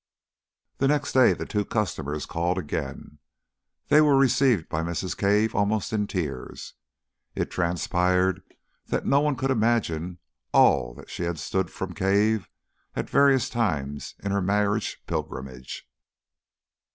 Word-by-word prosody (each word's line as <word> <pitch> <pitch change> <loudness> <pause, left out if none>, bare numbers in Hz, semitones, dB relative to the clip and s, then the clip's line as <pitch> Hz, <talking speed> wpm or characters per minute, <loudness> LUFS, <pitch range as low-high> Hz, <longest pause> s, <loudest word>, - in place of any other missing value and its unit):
The 135 - +3
next 145 0 0
day 130 -1 +6
the - - -5
two 105 -2 -1
customers 75 -9 -2
called 85 +2 -1
again. 75 -2 -5 0.7
They 150 - +7
were 145 -3 +5
received 130 -8 +3
by 80 - -2
Mrs. 85 +2 -3
Cave 105 +2 +2
almost 105 +1 0
in 105 -2 0
tears. 75 -10 -5 0.6
It - - -2
transpired 90 +2 +1 0.5
that - - -2
no 140 - +4
one 150 -1 +1
could 135 +1 -1
imagine 105 -8 0 0.4
all - - +4
that - - -13
she - - -6
had 85 -1 -2
stood 90 +5 -2
from 95 -1 -6
Cave 105 +2 +1 0.5
at - - -4
various 140 -3 +4
times 75 - -2
in 100 - -4
her 100 0 +1
married 105 +2 +1 0.2
pilgrimage.... 65 -1 -6
100 Hz, 135 wpm, -25 LUFS, 85-115 Hz, 0.7 s, They